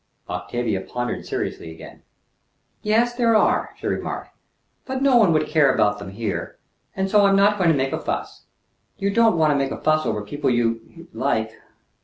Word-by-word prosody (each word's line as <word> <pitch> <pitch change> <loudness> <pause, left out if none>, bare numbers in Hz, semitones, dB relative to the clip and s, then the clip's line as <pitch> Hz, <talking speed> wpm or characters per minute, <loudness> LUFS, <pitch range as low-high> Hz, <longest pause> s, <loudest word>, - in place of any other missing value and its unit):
Octavia 95 +4 -3
pondered 120 +5 -4
seriously 80 - -4
again. 80 - -12 0.8
"Yes, 230 +3 +2
there 235 -2 +2
are," 215 - +2
she - - -10
remarked; - - -4 0.5
"but 265 0 -3
no 275 -2 +4
one 210 -7 +5
would 155 -1 +2
care 150 -3 +3
about 105 -3 +1
them 100 -1 -8
here, 105 +1 -4 0.4
and 190 0 -1
so 205 +1 +4
I'm 195 0 +4
not 205 +1 +3
going 175 -3 +3
to 160 - +3
make 135 0 -1
a - - -1
fuss. - - -5 0.5
You 200 0 -1
don't 225 -3 +3
want 155 -2 +3
to - - +2
make 135 -1 0
a - - -5
fuss 155 0 +1
over 105 - -2
people 145 +6 -2
you 115 -2 0 0.2
l - - -9
like." 110 -5 0
150 Hz, 190 wpm, -22 LUFS, -, 0.8 s, one